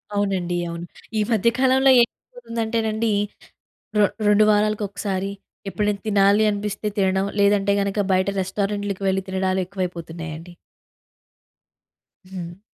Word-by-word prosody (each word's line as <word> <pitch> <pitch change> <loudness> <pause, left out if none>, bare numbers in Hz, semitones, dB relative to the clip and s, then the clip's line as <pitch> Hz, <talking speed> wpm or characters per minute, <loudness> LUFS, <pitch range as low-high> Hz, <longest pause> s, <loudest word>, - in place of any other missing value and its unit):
అవునండి. 190 -3 0
అవును. 170 0 -6 0.3
ఈ - - +3
మధ్య 225 0 +3
కాలంలో 265 +1 +5
ఏమైపోతుందంటేనండీ, 230 - -2 0.9
రొ 205 - +6 0.2
రొండు 210 +1 +5
వారాలకొకసారి, 205 -2 -1 0.4
ఎప్పుడైనా 205 +1 -1
తినాలి 200 0 +4
అనిపిస్తే 205 +1 -3
తినడం. 190 0 +2 0.2
లేదంటే 200 0 +3
గనుక, 200 +1 -1
బయట 185 +1 +2
రెస్టారెంట్లుకి 200 +1 -2
వెళ్ళి 190 0 +1
తినడాలెక్కువైపోతున్నాయండి. 180 -3 -3 1.7
హ్మ్. 180 -1 -8
200 Hz, 95 wpm, -22 LUFS, 185-210 Hz, 1.7 s, రొ